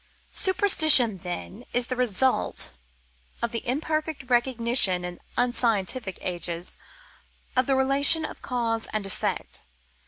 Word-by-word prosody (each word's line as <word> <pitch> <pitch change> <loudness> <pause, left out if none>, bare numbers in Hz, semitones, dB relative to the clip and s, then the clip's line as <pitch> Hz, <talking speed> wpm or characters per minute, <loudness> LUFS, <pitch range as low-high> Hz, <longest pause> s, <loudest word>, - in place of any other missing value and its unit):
"Superstition, 315 - +5
then, 180 +5 -7
is 245 0 0
the 255 - -5
result 250 - -1 0.7
of 235 - -2
the 230 - -5
imperfect 310 0 -4
recognition 235 -7 +1
in 175 0 -9 0.2
unscientific 230 -4 -1
ages 175 -1 -4 0.8
of 255 0 0
the 270 - +1
relations 280 +4 +5
of - - -13
cause 230 -3 -3
and 215 -2 -4
effect. 195 - -5
245 Hz, 115 wpm, -24 LUFS, 200-265 Hz, 0.8 s, Superstition